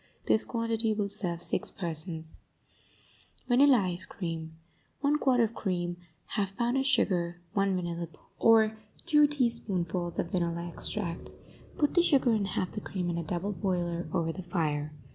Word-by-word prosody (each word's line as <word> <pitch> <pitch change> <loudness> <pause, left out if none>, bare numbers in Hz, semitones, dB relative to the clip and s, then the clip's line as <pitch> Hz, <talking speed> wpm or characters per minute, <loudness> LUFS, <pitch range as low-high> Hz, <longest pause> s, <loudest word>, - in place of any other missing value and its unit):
This 220 - +3
quantity 230 -2 0
will 205 -1 -1
serve 180 -4 -3
six - - 0
persons, 160 -2 -1 1.1
VANILLA 265 +1 +6
ICE 185 -3 0
CREAM 165 -4 -5 0.4
1 295 +1 +2
quart 255 -4 +3
of 230 -1 +2
cream 175 -4 -2 0.4
1/2 195 -1 -1
pound 240 +2 +1
of 270 - +1
sugar 175 -9 +1
1 195 -1 +2
vanilla 170 -1 -3
bean 160 - -20 0.2
or 220 -1 +5 0.3
two 300 -3 +6
teaspoonfuls 195 - 0
of 170 - -2
vanilla 170 -1 -1
extract 175 0 -4 0.4
Put 295 - +2
the 345 - +6
sugar 275 -7 +4
and 210 -3 +1
half 185 -1 -2
the 210 - -5
cream 180 -3 -3
in 170 - -2
a - - -3
double 175 +5 -2
boiler 175 -4 -1
over 165 -2 0
the 190 - -6
fire. 155 -4 -1
185 Hz, 160 wpm, -30 LUFS, 170-230 Hz, 1.1 s, VANILLA